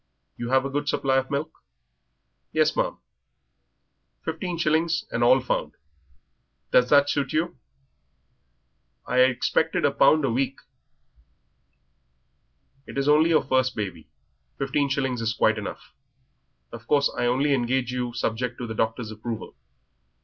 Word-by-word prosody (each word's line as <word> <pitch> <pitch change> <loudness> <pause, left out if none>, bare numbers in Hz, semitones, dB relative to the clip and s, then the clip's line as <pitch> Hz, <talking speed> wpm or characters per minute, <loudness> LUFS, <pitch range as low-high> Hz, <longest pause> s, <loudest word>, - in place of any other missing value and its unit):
You 120 - -5
have 130 +1 +3
a - - -2
good 145 +1 -2
supply 135 -2 +1
of 130 0 -1
milk?" 150 +3 -4 0.9
"Yes, - - +2
ma'am." - - -1 1.3
"Fifteen 170 +2 -3
shillings, 160 +1 +1
and 120 - 0
all 130 +2 +6
found. 130 - -2 1.0
Does 125 0 +4
that 145 -1 +5
suit 140 -2 -1
you?" 165 +3 0 1.5
"I 125 - -2
had 130 +1 +6
expected 125 -1 0
a - - +3
pound 155 -2 +4
a 130 - 0
week." 135 +3 -1 2.3
"It - - -8
is 140 +1 0
only 155 +2 +5
your 160 -2 +3
first 130 -1 +1
baby. 95 -7 -5 0.5
Fifteen 140 +1 0
shillings 130 -3 -1
is 115 0 0
quite 110 0 +2
enough. 100 - -8 0.8
Of 115 0 -10
course 145 -1 +2
I 120 - 0
only 135 +4 +2
engage 125 -1 0
you 125 -1 -2
subject 120 +2 -2
to 125 - -5
the 110 - -5
doctor's 115 +1 -2
approval. 110 +1 -6
130 Hz, 140 wpm, -25 LUFS, 120-145 Hz, 2.3 s, all